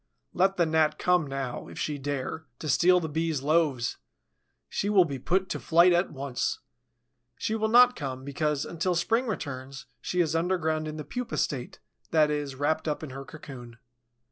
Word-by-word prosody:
Let 190 +1 +2
the 170 - +4
Gnat 160 -1 +2
come 180 -4 +2
now, 135 -2 -4
if - - -11
she 150 -2 -2
dare, 145 +3 -4
to 155 - -6
steal 180 +5 +5
the 165 - -3
Bee's 160 -2 -1
loaves! 150 -5 +1 0.7
She 205 - -2
will 195 -4 +6
be 140 -4 -5
put 185 +7 +1
to - - -2
flight 175 +2 +5
at 175 +1 +2
once. 135 -3 -2 0.8
She 220 - -2
will 220 0 +1
not 245 +2 +6
come, 130 -2 -5
because, 145 0 -1
until 175 +2 -1
spring 225 +9 +1
returns, 135 - -5 0.2
she 180 - -2
is 165 -2 +2
underground 160 -2 0
in 155 0 -5
the 150 - -6
pupa 250 -1 -4
state, 130 -4 -2 0.3
that 155 -2 +3
is, 145 -2 -3
wrapped 155 +4 0
up 150 +1 -2
in 150 - -6
her 135 +1 -7
cocoon. 130 -8 -10
155 Hz, 180 wpm, -28 LUFS, 140-180 Hz, 0.8 s, will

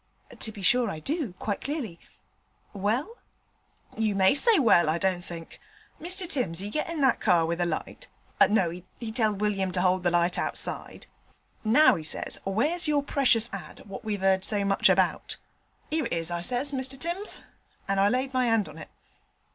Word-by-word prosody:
'To 220 - -4
be 205 -2 -10
sure 245 +3 +3
I 160 - -5
do, 285 - -3
quite 205 -2 -3
clearly 260 - -4 0.7
well?' 230 - -1 0.8
'You 220 -2 0
may 190 +2 +5
say 440 - +4
well, 210 - +4
I 160 - +1
don't 185 0 0
think. 165 -2 -9 0.4
Mr 360 +3 -3
Timms 245 - -1
he 200 +3 -5
gets 305 - -2
in 330 -3 -3
that 265 -3 +3
car 170 -2 +3
with 170 +1 -2
a 175 - +1
light 170 - -5 0.4
no, 195 -5 +2 0.3
he 230 -2 -6
telled 215 -3 0
William 195 -3 0
to 180 0 +1
'old 185 0 +3
the 175 - +2
light 175 +1 +1
outside. - - -3 0.6
"Now," 245 +8 +6
he 165 -6 -4
says, 155 - -2
"where's 295 - 0
your 290 -2 +2
precious 255 -5 +2
ad. 195 - -8
what 195 -2 -8
we've 205 -3 -3
'eard 190 -1 +3
so 205 -1 +3
much 195 0 +3
about?" - - +1 0.5
"'Ere 310 -5 0
it - - -4
is," 165 0 -1
I 170 0 -2
says, 250 +8 +1
"Mr 265 0 -1
Timms," 350 +7 -2 0.5
and 195 0 0
I 195 - +5
laid 260 +3 -1
my 255 -1 +2
'and 225 -4 +2
on 155 +1 -11
it.' - - -10
215 Hz, 185 wpm, -27 LUFS, 185-270 Hz, 0.8 s, Now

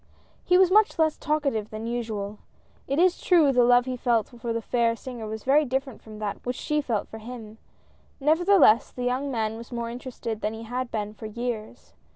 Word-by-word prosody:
He 360 - +4
was 370 -1 +5
much 425 +2 +4
less 315 -1 +2
talkative 280 -9 -1
than 215 +1 -6
usual; 220 -3 -4 0.5
it 275 - -1
is 360 +1 +3
true 330 -6 +4
the 250 -2 +4
love 245 0 +5
he 255 -1 -3
felt 235 -3 +1
for 235 -1 -6
the 230 - -1
fair 230 0 +1
singer 240 -3 -7
was 220 0 -6
very 285 +3 +4
different 265 -2 -3
from 215 -1 -11
that 210 -1 -4
which 250 +1 -3
she 300 +4 -1
felt 230 -7 -2
for 220 - -9
him, 225 -1 -9 0.6
nevertheless, 320 - +4
the 250 - -6
young 255 +3 -1
man 220 -3 -2
was 235 +2 -11
more 235 -1 -3
interested 235 -3 -6
than 215 +1 -2
he 225 - -8
had 245 +2 -3
been 210 -2 -3
for 215 +1 -8
years. 230 0 -6
240 Hz, 200 wpm, -26 LUFS, 220-275 Hz, 0.6 s, was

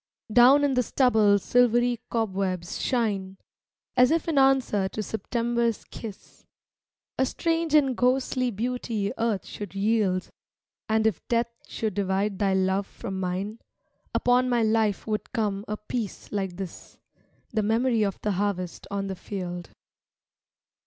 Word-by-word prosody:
Down 255 +5 +7
in 285 -2 +2
the 250 - +3
stubble 220 -5 +4
silvery 240 +2 +3
cobwebs 190 -6 -2
shine 200 -6 -1 0.6
As 250 0 +6
if 330 +1 +1
in 310 -4 +2
answer 260 -8 +3
to 215 - -4
September's 235 +1 -1
kiss 215 -4 -10 0.8
A 260 - +4
strange 330 0 0
and 275 -4 +4
ghostly 255 0 +1
beauty 230 -2 -2
Earth 225 -4 0
should 205 -2 -8
yield; 195 -3 +1 0.6
And 220 0 +2
if 220 -7 +1
Death 235 0 +1 0.2
should 220 -3 -3
divide 195 +1 -1
thy 195 -2 +2
love 190 +1 +1
from 190 -1 -6
mine 190 +4 -3 0.6
Upon 250 +1 +3
my 240 -2 +2
life 220 -2 +1
would 215 +1 -3
come 205 -4 -1
a 210 - -3
peace 210 -1 -5
like 195 -3 -2
this 190 -3 -8 0.3
— - - -39
The 220 - +2
memory 225 +2 +2
of 200 -2 0
the 210 - +1
harvest 190 -2 -2
on 200 0 -2
the 195 -1 -4
field. 180 -3 -6
220 Hz, 140 wpm, -26 LUFS, 195-245 Hz, 0.8 s, Down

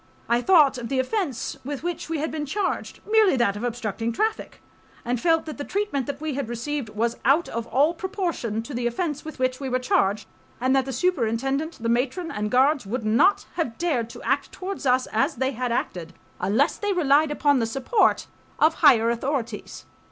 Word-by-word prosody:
I 235 +1 +2
thought 295 -6 +5
of 235 - -6
the 270 - -1
offense 270 - -2
with 285 +2 -5
which 350 -2 -4
we 330 - -1
had 310 +2 -2
been 300 -2 -4
charged,—merely 415 +2 +1
that 235 -6 +2
of 205 - -6
obstructing 230 -1 -2
traffic,—and 245 - -4
felt 325 -1 +2
that 310 -2 -7
the - - -2
treatment 305 - -2
that 280 -1 -4
we 310 -1 -3
had 265 -3 -3
received 240 +1 -3
was 230 +2 -1
out 285 +7 +3
of 230 0 -4
all 290 +6 +3
proportion 340 - -3
to 275 - -8
the 240 0 -1
offense 295 +4 -2
with 315 - -8
which 255 -1 0
we 270 -2 -4
were 255 - +1
charged, 215 -5 +1 0.3
and 260 +2 +2
that 265 -1 +2
the 270 - -4
superintendent, 270 +1 0
the - - 0
matron 260 +9 0
and 210 0 -2
guards 265 +4 +3
would 230 +2 -3
not 235 - +3
have 280 -10 -2
dared 275 -10 -1
to - - -11
act 275 +4 0
towards 380 -6 -5
us 255 0 +3
as 275 +8 +1
they 260 +2 0
had 250 -1 -3
acted 175 -7 -3 0.3
unless 220 - +1
they 410 -1 -1
relied 305 -3 +3
upon 290 -2 +2
the 225 - 0
support 365 - +2 0.3
of 315 +1 +4
higher 230 -2 +6
authorities. 235 -3 -4
270 Hz, 195 wpm, -24 LUFS, 235-315 Hz, 0.3 s, higher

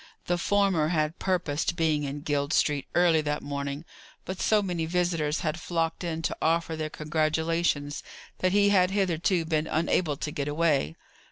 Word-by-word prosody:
The 175 0 0
former 195 -5 +2
had 155 0 0
purposed 175 -5 0
being 155 -3 +1
in 140 +1 -5
Guild 145 0 -1
Street 145 -2 +1
early 170 -3 +4
that 150 0 -2
morning; 140 +2 -4 0.4
but 185 0 -5
so 215 -1 +3
many 175 -4 -2
visitors 165 -3 0
had 160 +1 -2
flocked 165 0 -2
in 165 -1 -3
to - - -1
offer 165 0 +1
their 155 -1 -3
congratulations 155 -1 0 0.4
that 185 - +2
he 205 +1 +4
had 185 -3 +4
hitherto 180 -3 +1
been 155 -1 0
unable 160 -1 0
to 150 - -4
get 145 -3 -3
away. 145 - +1
160 Hz, 165 wpm, -27 LUFS, 150-175 Hz, 0.4 s, early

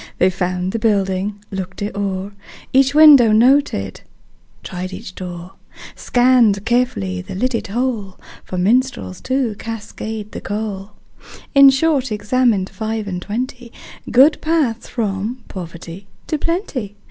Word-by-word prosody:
They 185 - +3
found 180 0 -2
the 230 - -2
building, 200 -1 0
looked 190 0 -5
it 205 0 -4
o'er, 195 -1 -3 0.4
Each 270 +1 +4
window 290 -7 +8
noted, 225 - +2 0.6
tried 185 +1 -6
each 185 - -8
door, 180 -1 -8 0.4
Scanned 245 -5 +3
carefully 100 - 0
the 90 - -8
lidded 230 +2 -1
hole 220 -3 -2 0.3
For 185 - -6
minstrels 205 - 0
to 260 -4 -1
cascade 220 -1 -6
the - - -7
coal 205 -1 -5 0.6
In 275 -1 +8
short, 270 -2 +1
examined 210 -1 +1
five 215 +2 -4
and 180 -2 -4
twenty 245 +4 -5 0.4
Good 270 +6 +5
paths 300 -8 0
from 220 +2 -3
poverty 175 +1 -9 0.2
to 310 - -2
plenty. 280 - -3
215 Hz, 125 wpm, -19 LUFS, 190-255 Hz, 0.6 s, window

